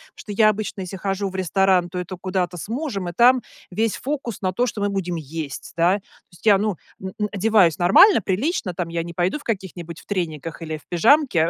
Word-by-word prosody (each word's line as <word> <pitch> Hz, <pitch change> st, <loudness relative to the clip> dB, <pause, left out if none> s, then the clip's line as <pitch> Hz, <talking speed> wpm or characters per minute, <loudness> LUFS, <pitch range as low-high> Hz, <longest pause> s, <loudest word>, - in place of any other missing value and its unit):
что 210 Hz, -, -9 dB
я 215 Hz, +1 st, +4 dB
обычно, 210 Hz, -1 st, -3 dB
если 185 Hz, +1 st, -6 dB
хожу 195 Hz, +1 st, -2 dB
в 190 Hz, -, -11 dB
ресторан, 190 Hz, -1 st, +2 dB
то 180 Hz, -, -4 dB
это 180 Hz, +1 st, -5 dB
куда-то 185 Hz, -1 st, -2 dB
с 175 Hz, -, -7 dB
мужем, 230 Hz, -, -3 dB
и -, -, -7 dB
там 250 Hz, +5 st, +5 dB, 0.3 s
весь 220 Hz, +4 st, -1 dB
фокус 270 Hz, -5 st, -4 dB
на 185 Hz, -1 st, -1 dB
то, 245 Hz, +7 st, +1 dB
что 230 Hz, -, -4 dB
мы 205 Hz, -, +1 dB
будем 185 Hz, -3 st, -2 dB
есть, 155 Hz, -2 st, -6 dB
да. 175 Hz, +3 st, +3 dB
То -, -, -13 dB, 0.3 s
есть 175 Hz, -, -18 dB
я, 205 Hz, -3 st, +7 dB
ну, 205 Hz, -2 st, -1 dB, 0.2 s
н 190 Hz, 0 st, -5 dB
н 210 Hz, -, +1 dB
одеваюсь 200 Hz, -5 st, +3 dB
нормально, 205 Hz, -, +6 dB
прилично, 200 Hz, -, -1 dB
там 175 Hz, -1 st, -3 dB
я 165 Hz, 0 st, -2 dB
не 170 Hz, 0 st, -8 dB
пойду 180 Hz, -, 0 dB
в -, -, -15 dB
каких-нибудь 180 Hz, -6 st, -5 dB
в -, -, -17 dB
трениках 165 Hz, -5 st, -4 dB
или 160 Hz, -1 st, -4 dB
в 150 Hz, -, -20 dB
пижамке. 185 Hz, -, +3 dB
190 Hz, 225 wpm, -22 LUFS, 175-215 Hz, 0.3 s, я